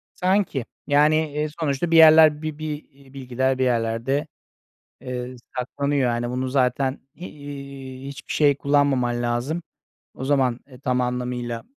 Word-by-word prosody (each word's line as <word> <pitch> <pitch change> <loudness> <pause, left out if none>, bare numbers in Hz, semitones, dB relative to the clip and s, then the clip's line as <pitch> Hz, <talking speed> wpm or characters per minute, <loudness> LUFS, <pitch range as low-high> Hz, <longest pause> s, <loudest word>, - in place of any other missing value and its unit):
Sanki. 185 - +1 0.2
Yani, 150 +2 +4 0.2
eee, 150 +1 -1
sonuçta 150 +1 -1
bir 165 - +4
yerler 155 -1 +7
bi 155 -1 -4
bir, 155 -1 -5
iii, 135 -1 -20
bilgiler 130 0 -1
bir 130 - +2
yerlerde, 120 +4 0 0.7
eee, 125 0 -5 0.2
saklanıyor. 135 +1 0
Hani 120 0 -2
bunu 130 +1 -2
zaten, 130 +1 +1
iii, 140 -5 -9
hiçbir 140 - -7
şey 145 -2 +3
kullanmaman 135 -4 +1
lazım. 120 +8 -1 0.5
O 130 - -6
zaman, 130 -3 +1
eee, 130 -2 -14
tam 125 -2 0
anlamıyla, 125 -1 -3
135 Hz, 135 wpm, -23 LUFS, 125-145 Hz, 0.7 s, yerler